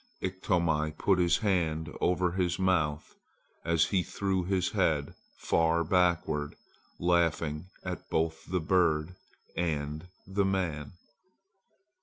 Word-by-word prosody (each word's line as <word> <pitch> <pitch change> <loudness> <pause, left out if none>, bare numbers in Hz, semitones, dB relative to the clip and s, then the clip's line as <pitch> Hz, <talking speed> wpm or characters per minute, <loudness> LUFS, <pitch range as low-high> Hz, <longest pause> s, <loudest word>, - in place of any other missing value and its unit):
Iktomi 85 -5 0
put 95 -2 +2
his 85 -1 +3
hand 80 -5 0
over 90 0 +2
his 90 -1 0
mouth 80 -6 0 0.5
as 85 -1 +3
he 90 +1 +1
threw 95 0 -1
his 95 0 0
head 80 -9 +1 0.2
far 85 0 +2
backward, 85 -4 +1 0.4
laughing 85 -2 +1 0.2
at - - -6
both 80 0 -1
the 90 +1 0
bird 80 -1 +2 0.4
and 80 -1 -2 0.2
man. 95 -7 -1
85 Hz, 105 wpm, -30 LUFS, 80-90 Hz, 0.5 s, his